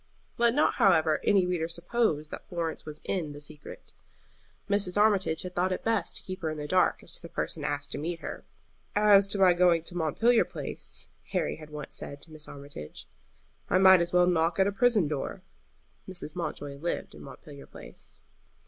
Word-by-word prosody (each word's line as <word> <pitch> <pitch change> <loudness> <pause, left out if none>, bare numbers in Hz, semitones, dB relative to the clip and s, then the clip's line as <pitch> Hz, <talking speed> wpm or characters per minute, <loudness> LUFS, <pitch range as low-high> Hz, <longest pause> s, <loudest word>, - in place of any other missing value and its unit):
Let 235 0 +4
not, 295 - +3
however, 160 -5 +4
any 195 -3 +4
reader 175 -3 -1
suppose 170 -2 -1
that - - -8
Florence 165 -3 -3
was 150 0 -8
in 165 -6 -2
the 145 - -9
secret. 150 0 -10 0.7
Mrs. 200 -1 +1
Armitage 200 -6 +2
had 180 0 -6
thought 180 +1 +1
it 185 - -3
best 225 0 0
to - - -7
keep 185 0 -7
her 160 - -1
in 155 - -4
the 150 0 -5
dark 185 +3 +2
as - - -8
to - - -3
the 170 - -10
person 155 - -4
asked 145 -1 -3
to - - -3
meet 165 +3 -3
her. - - -6 0.5
"As 205 -1 +6
to 200 - +1
my 190 -2 +6
going 175 -2 +3
to 175 - -6
Montpelier 225 +9 +3
Place," - - -4 0.3
Harry 185 - 0
had 155 -1 -11
once 150 -1 -8
said 140 - -5
to 165 - -12
Mrs. 155 -1 -9
Armitage, 140 - -9 0.6
"I - - +4
might 190 -1 +7
as 170 0 0
well 180 0 +5
knock 165 -1 +2
at 190 - +4
a 200 - +1
prison 210 -4 +3
door." 150 +5 -4 0.7
Mrs. 175 -5 -6
Mountjoy 145 -5 -4
lived 170 +4 -3
in - - -12
Montpelier 145 -4 -11
Place. - - -11
175 Hz, 195 wpm, -28 LUFS, 155-190 Hz, 0.7 s, might